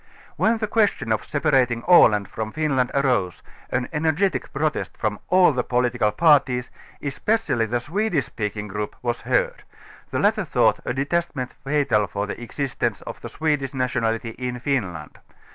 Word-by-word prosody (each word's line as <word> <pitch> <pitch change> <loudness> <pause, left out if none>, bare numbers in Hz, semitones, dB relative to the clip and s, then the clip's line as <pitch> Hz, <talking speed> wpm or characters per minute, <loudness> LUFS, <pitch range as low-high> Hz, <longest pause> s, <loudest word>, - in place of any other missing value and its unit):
Wheiythe 225 -1 +2
q^^estion 205 - +1
of 110 - -2
separating 130 -6 +1
Aland 105 - +6
from 110 -1 -5
Finland 140 -4 0
arose^^:=├ĀiL_├ŖBefgetic 140 - -1
protest 150 +2 -2
from 105 -2 -2
all 180 -4 +5
the 125 -1 0
political 125 -3 +1
parties, 130 -2 +3 0.3
especially 145 - 0
the 120 +2 0
Swedish 170 - -1
speaking 105 -1 -4
group, 105 +1 -4
was 120 -1 -1
heard; - - 0 0.5
the - - -2
latter - - +2
thought - - +2
a - - -1
detachment 140 -2 -2
fatal 135 -8 +1
for 100 0 -3
the 105 - -6
existense 130 +3 -3
of - - -8
the - - -7
Swedish 150 -3 -1
nationalit:\' 115 -3 -1
in 125 -1 -3
Finland. 100 - -3
130 Hz, 140 wpm, -23 LUFS, 115-150 Hz, 0.5 s, Aland